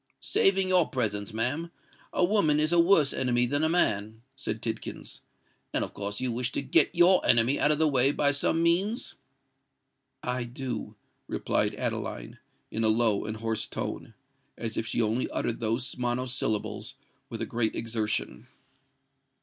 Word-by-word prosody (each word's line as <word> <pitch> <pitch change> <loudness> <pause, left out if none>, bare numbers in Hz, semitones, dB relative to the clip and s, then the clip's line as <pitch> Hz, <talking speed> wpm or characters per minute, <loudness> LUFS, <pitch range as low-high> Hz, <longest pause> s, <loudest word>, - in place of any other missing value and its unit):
"Saving 195 -1 +2
your 180 -3 +4
presence, 105 -5 -2
ma'am, 130 +10 -1 0.4
a 180 - +2
woman 175 -7 +2
is 155 +1 +2
a 175 - +4
worse 170 -5 +4
enemy 125 -1 +2
than 145 +5 -1
a 160 - +2
man," 110 - 0
said 115 -5 -3
Tidkins. 110 -1 -5 0.5
"And - - +2
of - - -6
course 100 0 -3
you 130 -1 -1
wish 120 +1 -2
to - - -2
get 135 +6 +3
your 175 +2 +5
enemy 120 +4 +3
out 145 - +3
of 150 - +3
the 160 0 +3
way 135 -1 +4
by 145 0 +2
some 165 +3 +1
means?" 190 +8 +1 1.1
"I 125 -1 -2
do," 120 -3 -5 0.3
replied - - -1
Adeline, - - -4 0.3
in 115 - -2
a - - +5
low 110 -2 +2
and 110 0 -4
hoarse 110 0 -2
tone—as 115 -1 -7
if 115 - -2
she 115 - 0
only 115 +4 0
uttered 115 - -2
those 115 +3 -1
monosyllables 125 -3 -2 0.3
with - - -4
a - - -2
great 115 -2 0
exertion. 110 0 -3
125 Hz, 160 wpm, -28 LUFS, 110-150 Hz, 1.1 s, your